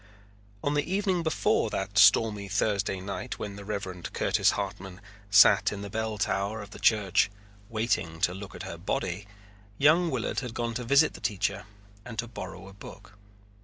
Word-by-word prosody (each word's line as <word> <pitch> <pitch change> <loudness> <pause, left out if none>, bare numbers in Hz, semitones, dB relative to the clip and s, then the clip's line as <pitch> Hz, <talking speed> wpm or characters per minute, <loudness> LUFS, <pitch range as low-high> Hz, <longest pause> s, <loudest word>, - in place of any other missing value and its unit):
On 145 - 0
the 145 +4 -1
evening 190 -2 +1
before 160 -1 +1
that 95 +1 -4
stormy 105 0 +5
Thursday 100 -1 0
night 100 +1 -5
when 100 -1 -6
the 100 - -9
Reverend 95 -4 -5
Curtis - - +2
Hartman 95 -1 -5 0.3
sat 100 -1 +6
in 100 -1 -6
the 100 - -7
bell 110 0 -2
tower 100 +2 -1
of 100 0 -9
the - - -10
church 100 -3 +3 0.4
waiting 110 -8 -1
to 90 - +2
look 95 0 -9
at - - -7
her - - -7
body, 95 +4 -3 0.5
young 165 +5 +4
Willard 125 -7 -2
had 125 -3 -6
gone 120 -1 -2
to 125 +2 -4
visit 140 +6 +4
the - - -11
teacher 100 0 -1 0.4
and 120 -1 -9
to 120 +2 -2
borrow 100 -3 -8
a 95 - -12
book. 100 0 -12
105 Hz, 175 wpm, -28 LUFS, 100-115 Hz, 0.5 s, sat